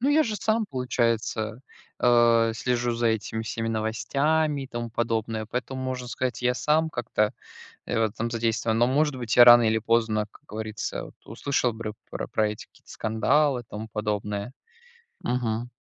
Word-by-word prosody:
Ну 265 - +1
я 310 +2 +5
же 220 -6 -2
сам, 220 +3 +1
получается, 115 - -1 0.4
а, 120 -2 +4
слежу 120 +1 0
за 120 0 0
этими 110 0 -2
всеми 115 0 -3
новостями, 140 +7 0
и - - -6
тому 120 -2 -5
подобное. 110 -1 -2
Поэтому, 130 +1 -3
можно 130 -1 -3
сказать, 125 -1 -3
я 125 0 +2
сам 155 +4 +2
как-то, 115 -5 -1 0.5
э, - - -2
в 115 - +3
этом 115 +2 -3
задействован. 115 -1 0
Но, 120 - +4
может 145 +2 +2
быть, 120 -2 -2
я 120 - +10
рано 120 0 +9
или 110 0 +2
поздно, 110 -1 +1
как - - -19
говорится, 110 0 -5
вот - - -13
услышал 125 +2 0
бры 110 -1 -5 0.2
про - - -5
про 110 -1 +1
эти 105 - -7
какие-то - - -19
скандалы 130 +4 +1
и - - -17
тому 110 0 -7
подобное. 105 0 -3 0.7
Мгм. 120 -1 -1
120 Hz, 170 wpm, -26 LUFS, 110-130 Hz, 0.7 s, я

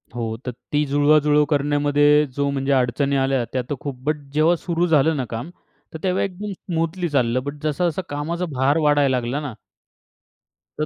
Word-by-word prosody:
हो, 115 -2 -3
तर 125 - -2 0.2
ती 150 0 +2
जुळवाजुळव 150 +1 +4
करण्यामध्ये 145 0 +3
जो 140 0 0
म्हणजे 140 0 -1
अडचणी 135 +2 +1
आल्या, 135 -2 +1
त्या 130 - 0
तर 145 - -1
खूप. 140 -3 -5
बट, 150 +1 +1 0.2
जेव्हा 155 +3 +4
सुरू 170 0 -1
झालं 160 0 +3
ना 130 - -2
काम, 115 +7 -5 0.4
तर - - -5
तेव्हा 185 0 +1
एकदम 200 +2 -5
स्मूथली 170 -1 -3
चाललं. 125 -3 +1
बट, 145 +1 -4
जसा-जसा 165 +3 0
कामाचा 165 +5 -3
भार 135 +4 +2
वाढायला 145 -4 +3
लागला 120 +4 -3
ना 140 -6 -5 1.3
तर 155 - +1
145 Hz, 170 wpm, -22 LUFS, 135-160 Hz, 1.3 s, जुळवाजुळव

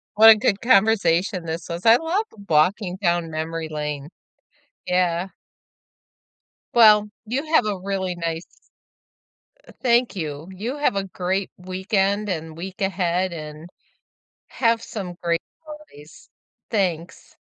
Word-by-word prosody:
What 220 +1 +9
a 220 - +10
good 210 -1 0
conversation 195 -5 +3
this 165 +1 -5
was, 170 +5 -5
I 225 +1 +8
love 355 +7 -1 0.2
walking 180 +5 +2
down 170 -2 0
memory 160 0 -4
lane. 150 -1 -4 0.8
Yeah. 180 0 +1 1.5
Well, 210 -3 +6 0.2
you 260 +7 -2
have 285 -9 +4
a 200 -3 -2
really 190 -1 -2
nice 165 -1 -4 1.2
eh - - -14
thank 240 -4 +2
you, 155 0 -5
you 225 +10 -5
have 290 -8 +1
a 195 - 0
great 190 +1 -2
weekend 195 +3 -1
and 160 -3 -4
week 190 +4 -8
ahead, 185 -1 0
and 155 +1 -8 0.8
have 230 -2 +1
some 190 -6 -6
great 170 0 0 0.2
holidays, 300 - -13 0.4
thanks. 180 -6 -2
185 Hz, 125 wpm, -23 LUFS, 170-210 Hz, 1.5 s, a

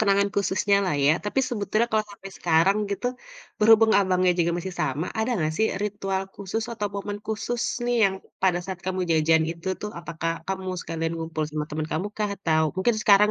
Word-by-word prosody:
kenangan 200 -1 +3
khususnyalah 200 0 +2
ya, 150 - +6
tapi 210 +6 +1
sebetulnya 215 0 0
kalau 215 -1 +2
sampai 195 -1 -10
sekarang 170 +4 +3 0.2
gitu, 225 +5 -3 0.5
berhubung 220 +1 +6
abangnya 185 -1 +3
juga 170 0 +2
masih 180 +1 -5
sama, 145 +6 -1
ada 220 +3 0
enggak 155 -2 0
sih 220 - +4 0.2
ritual 195 -2 -2
khusus 205 +3 -3
atau 210 -3 -2
momen 205 +1 -4
khusus 225 +2 -2 0.2
nih 245 0 +1
yang 195 -1 +2 0.3
pada 185 -2 +3
saat 185 -2 -6
kamu 185 0 -1
jajan 160 0 +4
itu 170 +2 -7
tuh, 210 - -3
apakah 165 -1 -3 0.2
kamu 190 -1 -3
sekalian 165 0 -3
ngumpul 160 -1 -3
sama 150 0 -3
teman 155 +1 -2
kamukah? 205 +5 -2
Atau 160 -4 +2
mungkin 190 +6 +2
sekarang 210 +1 +6
190 Hz, 180 wpm, -25 LUFS, 165-210 Hz, 0.5 s, ya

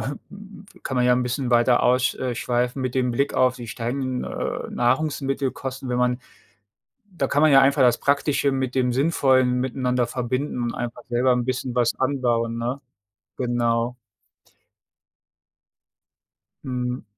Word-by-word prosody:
m 135 +6 -5
m 200 0 -13 0.2
kann 130 - -4
man 125 0 +3
ja 125 - +5
'n 125 - 0
bisschen 125 +1 -2
weiter 120 +1 +4
aus 125 +1 +2
äh, 125 -2 -3
schweifen 125 +2 -1
mit 130 -1 -3
dem 125 -1 +1
Blick 140 +4 0
auf 130 -1 +2
die 120 - -8
steigenden, 125 +3 -3
äh, - - -4
Nahrungsmittelkosten, 135 0 -1
wenn 125 - -1
man 125 0 +1 0.9
da 140 -6 -1
kann 145 +3 +1
man 155 - +6
ja 135 - +8
einfach 140 0 +4
das 125 -1 +4
Praktische 140 0 +1
mit 130 -1 -2
dem 125 -2 +1
Sinnvollen 130 -3 +2
miteinander 125 -1 0
verbinden 125 +1 -3
und 120 - -2
einfach 120 0 -5
selber 125 +1 +3
'n 125 -1 0
bisschen 130 0 -3
was 120 -2 +2
anbauen, 120 -4 0
ne? 120 +4 -3 0.6
Genau. 120 -1 0 2.7
Mhm. 125 -1 -3
125 Hz, 150 wpm, -23 LUFS, 120-135 Hz, 2.7 s, ja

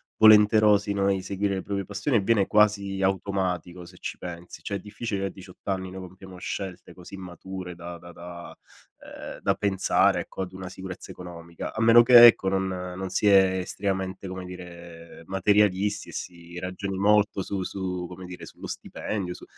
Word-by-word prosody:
volenterosi, 105 -1 +6
no, 100 -1 +1
a - - +4
inseguire 100 +1 -1
le 95 - -3
proprie 100 -1 -3
passioni 105 +7 -2
e - - +2
viene 100 -1 +2
quasi 100 -2 +2
automatico, 95 -2 -1
se - - -15
ci - - -6
pensi. 90 0 -9
Cioè 100 - -2
è - - -9
difficile 105 -2 -4
a - - -1
18 95 -1 -13
anni 95 -1 -2
noi 95 - -7
compiamo 95 0 -13
scelte 95 -1 -6
così 90 +2 -11
mature 90 0 -8
da 85 0 -8
da 85 +1 -12
da 85 +1 -10 0.4
ehm, - - -9
da - - +2
pensare, 100 -2 +2
ecco, - - -7
ad 90 0 -8
una 95 -1 -7
sicurezza 95 0 -8
economica; 85 -1 -8
a 110 - -3
meno 115 +1 +8
che 120 0 +10
ecco, 115 -4 +6
non 95 0 +1
non 90 0 -5
si 105 - +1
è 95 -2 +5
estremamente, 95 0 -3
come 95 0 -6
dire, 85 -2 -11
materialisti 100 +1 +2
e - - -11
si 85 -1 -8
ragioni 95 +1 -4
molto 105 0 +3
su 100 0 -3
su 90 -1 -4
come 90 +1 -10
dire, 90 0 -9
sullo - - -10
stipendio, 95 -4 -4
su - - -13
95 Hz, 180 wpm, -26 LUFS, 90-100 Hz, 0.4 s, che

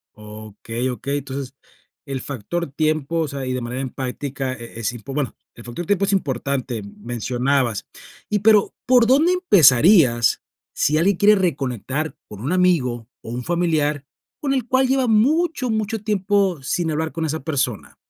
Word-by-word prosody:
Okey, 110 +3 -6
okey. 140 +3 -3
Entonces, 135 -1 -6 0.5
el 135 -2 -4
factor 145 +7 -4
tiempo, 155 +1 0
o 160 - -1
sea, 140 -2 -5
y 130 - -2
de 125 - -2
manera 120 +2 -4
empática 130 0 -4
e 115 -2 -10
es 115 +1 -2
y 120 - -8
pu 135 +5 -8
bueno, 145 -2 -2 0.2
el 115 - -12
factor 120 +9 -6
tiempo 200 +1 +1
es 200 - 0
importante, 135 - -1
mencionabas. 120 +2 -2 0.4
Y, 210 - +1
pero, 210 0 +4
¿por 250 -2 +5
dónde 305 +8 +4
empezarías, 155 - +5 0.3
si 155 +1 +1
alguien 185 +3 +2
quiere 210 +2 +6
reconectar 145 - -2
con 105 -1 -10
un 140 +9 -1
amigo, 140 -11 +1
o - - -10
un 125 +1 -4
familiar, 155 -4 0 0.3
con 275 -2 -1
el 255 -4 -1
cual 260 +1 +3
lleva 265 -1 +1
mucho, 270 +5 +2
mucho 220 0 -1
tiempo, 200 -5 +1
sin 160 +4 -1
hablar 160 +1 -2
con 165 -1 -3
esa 160 +1 -3
persona? 135 -8 -2
145 Hz, 165 wpm, -21 LUFS, 125-195 Hz, 0.5 s, quiere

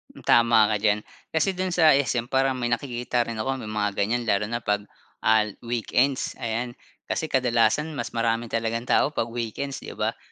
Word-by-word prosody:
Hmm, - - -14
tama 115 -2 +5
ka - - +2
diyan. 105 -1 +3 0.3
Kasi 160 +5 +1
do'n 185 0 -2
sa 165 -3 +5
SM 130 -4 +1
parang 135 0 +2
may 120 -1 -1
nakikita 120 -1 -1
rin 115 -1 -5
ako 135 +4 -2
may 110 - -7
mga 105 -1 0
ganyan 115 +5 0
lalo 105 -2 +1
na 120 - -1
'pag 105 -3 -1 0.4
ah, 110 -1 +4 0.2
weekends, 120 +3 0
ayan. 120 +2 -2 0.3
Kasi 160 - -2
kadalasan 125 +4 +2
mas 145 - -4
marami 115 0 -1
talagang 115 +1 -2
tao 150 - +3
'pag 115 -5 -1
weekends, 120 +4 -4
'di - - -7
ba? - - -2
120 Hz, 185 wpm, -25 LUFS, 110-135 Hz, 0.4 s, tama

